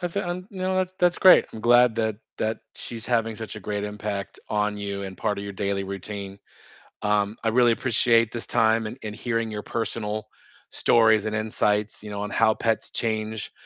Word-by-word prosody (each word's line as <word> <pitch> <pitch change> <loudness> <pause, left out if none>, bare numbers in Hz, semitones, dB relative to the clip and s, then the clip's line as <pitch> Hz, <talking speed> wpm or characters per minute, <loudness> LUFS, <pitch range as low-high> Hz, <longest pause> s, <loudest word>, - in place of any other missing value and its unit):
I 175 - -1
feel, 200 +4 -3
um, 180 +1 -4
no, 185 -2 -2
that's 185 0 0
that's 175 -2 +3
great, 185 - +7
I'm 110 - -7
glad 120 0 +5
that 110 -2 0 0.2
that 110 0 -1
she's 115 -1 -5
having 115 -2 0
such 110 -1 -7
a - - -7
great 105 +1 -3
impact 105 -1 -5
on 105 -1 0
you 100 -1 -4
and 95 -1 -7
part 105 -2 -1
of 100 - -5
your 100 - -5
daily 100 0 -2
routine, 100 0 -6 0.6
um, 105 0 +1
I - - 0
really 120 +1 +4
appreciate 115 -1 +3
this 120 - -4
time 110 0 +2
and 115 - -7
and 105 -1 -5
hearing 115 0 -2
your 105 -1 -5
personal 110 -2 -3 0.4
stories 110 -2 +4
and 110 0 -2
insights, 105 -1 0
you 105 - -7
know, 100 0 -4
on 105 - -3
how 110 +1 +3
pets 110 0 -1
change 110 -1 -2
110 Hz, 200 wpm, -25 LUFS, 105-115 Hz, 0.6 s, great